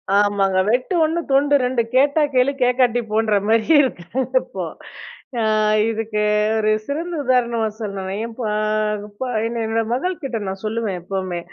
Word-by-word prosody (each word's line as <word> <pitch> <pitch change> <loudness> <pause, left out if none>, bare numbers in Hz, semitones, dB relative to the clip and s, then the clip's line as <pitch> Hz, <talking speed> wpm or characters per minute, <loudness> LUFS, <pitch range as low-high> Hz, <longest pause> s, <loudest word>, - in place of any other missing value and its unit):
ஆமாங்க, 200 -2 +2
வெட்டு 250 - 0
1 320 +2 0
துண்டு 285 +1 +3
2 250 -1 +1
கேட்டா 285 +4 +4
கேளு 255 +2 +3
கேட்காட்டி 245 -1 +2
போன்ற 215 -1 +2
மாரி 220 0 +3 0.2
இருக்காங்க 250 +1 -3
இப்போ. - - -6 0.7
ஆ. - - +1 0.5
இதுக்கு 220 -1 -2 0.4
ஒரு 215 -1 +1 0.2
சிறந்த 335 +5 -3
உதாரணமா 240 -3 +1
சொல்லணும்னா. 195 -3 -4
என் 230 -1 -9
பா 220 -3 -1 0.9
என் 235 +1 -3
என்னோட 225 +1 0
மகள்கிட்ட 275 -3 -2
நான் 190 0 -5
சொல்லுவேன் 215 -4 -2
எப்பவுமே, 185 -1 -3
230 Hz, 135 wpm, -20 LUFS, 210-260 Hz, 0.9 s, கேட்டா